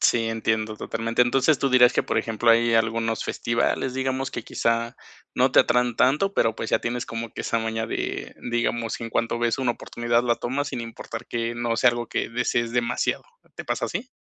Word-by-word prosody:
Sí, 115 -1 +3
entiendo 110 -1 -1
totalmente. 115 +3 0
Entonces, 135 +4 +3
tú 135 - +1
dirás 125 -1 +6
que, - - +1
por - - -2
ejemplo, 115 +1 +2
hay 115 0 +4
algunos 115 0 +1
festivales, 120 +2 -1
digamos, 130 0 -1
que 120 - -6
quizá 115 +1 -1 0.4
no - - +3
te - - +4
atraen 125 -1 +1
tanto, 150 +10 +3
pero, 115 -1 +2
pues, 110 - -5
ya - - +3
tienes 120 0 -3
como 115 0 -5
que - - -6
esa 115 - 0
maña 110 0 -2
de, - - -4 0.2
digamos, 120 -1 -1
en 115 -1 -5
cuanto 115 +1 0
ves 120 +2 +1
una 125 -2 +1
oportunidad 120 +1 -1
la 120 -1 +1
tomas, 140 +4 -2
sin 120 - -4
importar 115 -1 -7
que 115 0 -2
no 120 -1 -1
sea 125 +2 +5
algo 120 -1 -4
que - - -2
desees 120 0 0
demasiado. 120 -1 0 0.3
¿Te - - -6
pasa - - -1
así? 255 - -4
120 Hz, 205 wpm, -24 LUFS, 115-125 Hz, 0.4 s, dirás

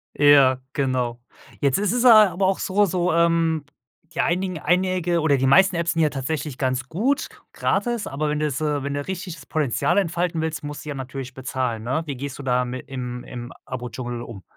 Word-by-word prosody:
Ja, 140 -3 +6
genau. 125 -3 -1 0.4
Jetzt 140 -2 +3
ist 200 -1 0
es, 245 +1 +1
äh, 255 - +6
aber 200 -5 +6
auch 190 - +1
so 205 +2 +2
so 180 -1 0
ähm, 165 -2 +2 0.5
die 170 - +1
einigen 180 0 0
einige 180 -1 +1
oder 145 -3 +3
die 135 - +1
meisten 185 +7 +5
Apps 170 0 0
sind 165 - +1
ja 155 - +4
tatsächlich 140 0 -4
ganz 130 -1 -1
gut 245 - 0 0.3
gratis, 240 -3 -1
aber 150 +2 -2
wenn 150 0 -1
du 155 - 0
jetzt, 145 0 -2
äh 145 -2 0
wenn 140 0 -3
du 145 0 -3
richtig 185 -2 -5
das 135 - -14
Potenzial 145 - 0
entfalten 170 -2 0
willst, 160 -1 -3
musst 145 +1 -7
du - - -6
ja 145 - -4
natürlich 130 0 -6
bezahlen, 125 -4 -3
ne? 135 +7 -1
Wie 140 - -4
gehst 135 +1 -6
du 140 - -6
dami 125 0 0
im 125 -1 -6
im 120 0 -8
Abo 125 -1 -5
Dschungel 120 -1 -5
um? 115 -5 -9
145 Hz, 210 wpm, -23 LUFS, 130-175 Hz, 0.5 s, Ja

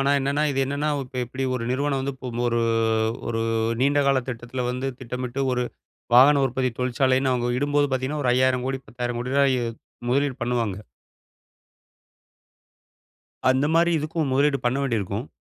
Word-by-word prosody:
ஆனா 135 +1 +2
என்னன்னா 140 +2 0
இது 135 -1 0
என்னன்னா 140 +2 -1 0.2
இப்ப 125 0 -11
எப்படி 130 +2 -4
ஒரு 115 -2 -2
நிறுவனம் 140 +1 0
வந்து 140 0 -3
பு 130 - -4 0.2
ஒரு, 120 0 +1 0.7
ஒரு 115 -1 -1 0.4
நீண்ட 145 +2 +3
கால 135 -1 +3
திட்டத்தில 120 +1 -4
வந்து 130 +2 -3
திட்டமிட்டு 125 +1 -4
ஒரு 125 0 0 0.5
வாகன 140 +3 +7
உற்பத்தி 130 0 -1
தொழிற்சாலைன்னு 130 +1 +2
அவங்க 120 -1 0
இடும்போது 145 +1 +2
பாத்தீங்கன்னா 130 +3 -1
ஒரு 125 - +3
5,000,00,00,000, 130 +1 +1
10,000,00,00,000 120 +2 -3
ரூபாய் 135 -2 +4 0.5
முதலீடு 140 +1 +1
பண்ணுவாங்க. 120 -5 -1 2.7
அந்த 130 +2 +2
மாரி, 170 +1 +4
இதுக்கும் 155 -1 -2
முதலீடு 140 +1 +3
பண்ண 120 +3 +1
வேண்டியிருக்கும். 115 -2 -2
130 Hz, 140 wpm, -24 LUFS, 125-140 Hz, 2.7 s, வாகன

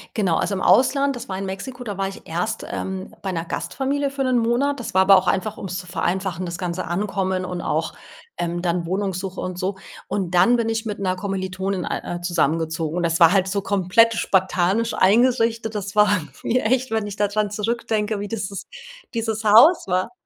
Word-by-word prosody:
Genau, 190 -7 +1
also, 200 - 0
im 185 - -3
Ausland, 275 +1 +3
das 240 - -8
war 190 - -3
in 195 - -4
Mexiko, 245 +6 -6
da 205 -3 -5
war 195 0 -1
ich 195 - -12
erst, 180 +7 -2
ähm, 190 0 -5
bei 190 - -3
'ner 165 -1 -3
Gastfamilie 280 +8 -2
für 275 0 -3
1 250 -2 +2
Monat. 255 +5 +1
Das - - -6
war 190 0 +5
aber 195 0 +7
auch 185 0 +3
einfach 205 +4 0
ums 185 -1 -5
zu 180 -2 -8
vereinfachen, 185 0 -2
das 170 0 -5
ganze 180 -1 -3
Ankommen, 190 0 -1
und 180 -1 -4
auch, 160 +2 -1 0.4
ähm, 175 0 -2
dann 175 -1 -1
Wohnungssuche 190 0 -3
und 185 -1 -4
so. 190 +1 -2 0.3
Und 185 -4 -2
dann 235 +8 +5
bin 230 -1 0
ich 225 0 -1
mit 210 -2 -4
'ner 185 -1 0
Kommilitonin 190 -1 -3
ei 175 - -4
äh, - - -10
zusammengezogen 165 -1 -1
und 175 - 0
das 165 +1 0
war 165 +1 +8
halt 190 -1 +3
so 200 +1 -1
komplett 200 +4 +3
spartanisch 190 +4 +1
eingerichtet. 230 +1 +2
Das 200 0 -4
war 210 -1 +5 0.3
mir 245 -1 0
echt, 260 +1 +1
wenn 220 -2 0
ich 205 - -6
da 205 -1 +1
dran 210 0 0
zurückdenke, 215 0 -1
wie 205 - -4
dieses 200 -2 -5 0.5
dieses 220 -1 -2
Haus 230 - +6
war. 185 +5 0
195 Hz, 205 wpm, -22 LUFS, 185-225 Hz, 0.5 s, war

